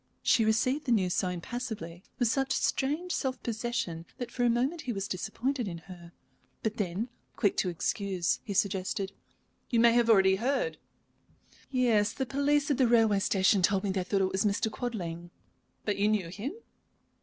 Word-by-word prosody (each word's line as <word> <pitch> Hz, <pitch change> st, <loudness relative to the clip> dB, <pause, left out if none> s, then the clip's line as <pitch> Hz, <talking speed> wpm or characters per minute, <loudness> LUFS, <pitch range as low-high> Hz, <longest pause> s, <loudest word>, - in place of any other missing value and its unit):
She 225 Hz, -, +4 dB
received 255 Hz, +7 st, +1 dB
the 245 Hz, -, 0 dB
news 185 Hz, -6 st, +2 dB
so 185 Hz, -, +1 dB
impassively, 180 Hz, -2 st, -5 dB
with 245 Hz, -, +2 dB
such 270 Hz, +3 st, +1 dB
strange 305 Hz, +7 st, 0 dB
self 265 Hz, -6 st, -1 dB
possession, 220 Hz, -8 st, -3 dB
that 245 Hz, -, -5 dB
for 245 Hz, -, -1 dB
a 240 Hz, -, +4 dB
moment 260 Hz, +8 st, 0 dB
he 250 Hz, -, -3 dB
was 195 Hz, -3 st, -3 dB
disappointed 230 Hz, +6 st, -2 dB
in 170 Hz, -3 st, -4 dB
her. 170 Hz, -1 st, -12 dB, 0.5 s
But 220 Hz, 0 st, -1 dB
then, 200 Hz, +4 st, -2 dB, 0.3 s
quick 205 Hz, -5 st, +2 dB
to 185 Hz, -, +1 dB
excuse, 180 Hz, +1 st, -1 dB
he 200 Hz, -, -5 dB
suggested: 195 Hz, 0 st, 0 dB, 0.6 s
"You 235 Hz, -, +2 dB
may 235 Hz, 0 st, +6 dB
have 235 Hz, -1 st, +3 dB
already 190 Hz, -3 st, +5 dB
heard?" 280 Hz, -, -1 dB, 0.9 s
"Yes; 230 Hz, -5 st, +2 dB
the 265 Hz, -, -2 dB
police 285 Hz, +2 st, +2 dB
people -, -, +4 dB
at 240 Hz, -, +3 dB
the -, -, 0 dB
railway 220 Hz, -4 st, +4 dB
station 195 Hz, 0 st, +3 dB
told 190 Hz, +2 st, +2 dB
me 200 Hz, -, 0 dB
they 190 Hz, -1 st, -1 dB
thought 195 Hz, +2 st, 0 dB
it 190 Hz, 0 st, +1 dB
was 190 Hz, -, +1 dB
Mr. 210 Hz, +1 st, +1 dB
Quadling." 175 Hz, -8 st, -4 dB, 0.6 s
"But 205 Hz, -, 0 dB
you 205 Hz, +1 st, +2 dB
knew 210 Hz, -5 st, +1 dB
him?" 210 Hz, -, -5 dB
215 Hz, 180 wpm, -30 LUFS, 190-245 Hz, 0.9 s, may